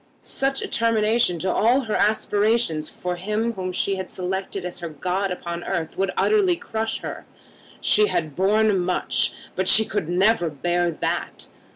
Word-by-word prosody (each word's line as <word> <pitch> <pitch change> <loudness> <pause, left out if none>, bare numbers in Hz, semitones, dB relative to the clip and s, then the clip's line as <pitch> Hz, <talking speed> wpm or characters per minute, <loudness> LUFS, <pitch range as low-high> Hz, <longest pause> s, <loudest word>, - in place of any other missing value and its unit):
Such 270 0 -1
a - - -3
termination 225 -4 +2
to 185 +3 -1
all 245 +5 +3
her 220 -4 -4
aspirations 210 -6 +1
for 180 0 -4
him 215 +5 -1
whom 185 -3 -4
she 195 +2 0
had 190 -1 -5
selected 190 +1 -4
as 180 - -6
her 170 -1 -5
god 185 +6 -2
upon 170 -1 -5
earth 165 -4 -3
would 195 0 0
utterly 400 -4 +3
crush 225 -8 -3
her. - - -7 0.5
She 425 0 +4
had 155 - -2
borne 205 +1 +3
much, 180 0 0 0.2
but 185 0 0
she 220 - +6
could 190 -7 -3
never 180 0 +3
bear 175 +4 0
that. 165 - -3
190 Hz, 165 wpm, -23 LUFS, 175-220 Hz, 0.5 s, she